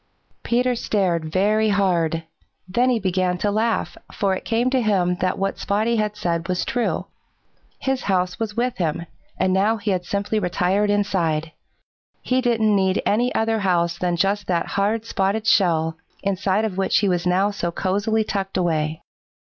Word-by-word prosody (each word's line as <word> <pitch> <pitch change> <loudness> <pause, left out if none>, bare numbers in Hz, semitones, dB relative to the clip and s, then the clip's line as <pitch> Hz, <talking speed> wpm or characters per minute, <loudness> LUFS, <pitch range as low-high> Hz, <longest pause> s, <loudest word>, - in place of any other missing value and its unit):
Peter 250 +1 +1
stared 180 -9 -1
very 215 +4 +2
hard. 175 -5 +1 0.4
Then 240 +7 +2
he 245 - +2
began 185 -2 0
to 205 +3 0
laugh, 225 +2 0 0.2
for 195 -1 0
it 190 - -5
came 235 +3 +1
to 260 -1 +2
him 190 -5 +2
that 185 0 -1
what 195 0 -2
Spotty 220 +3 0
had 210 -1 -1
said 170 -5 -2
was 180 0 0
true. 240 0 -1 0.7
His 265 -1 -1
house 180 -1 0
was 220 -1 -3
with 245 +1 0
him, 170 -1 -1 0.3
and 185 0 +1
now 205 +4 +2
he 205 -1 -2
had 180 -2 -1
simply 205 +3 -1
retired 190 +2 +1
inside. 175 -6 0 0.7
He 255 0 +1
didn't 225 -4 +2
need 190 -1 +1
any 240 +4 +2
other 225 0 +1
house 175 -3 +1
than 175 -1 0
just 200 +3 0
that 175 -2 0
hard, 210 +3 0
spotted 205 +1 -1
shell, 170 -8 +2 0.3
inside 200 +2 0
of 195 -4 -4
which 195 - +2
he 205 - +2
was 180 -1 0
now 190 +3 +2
so 175 -4 -3
cosily 205 +5 0
tucked 195 -2 -3
away. 160 -3 -1
195 Hz, 170 wpm, -22 LUFS, 180-220 Hz, 0.7 s, very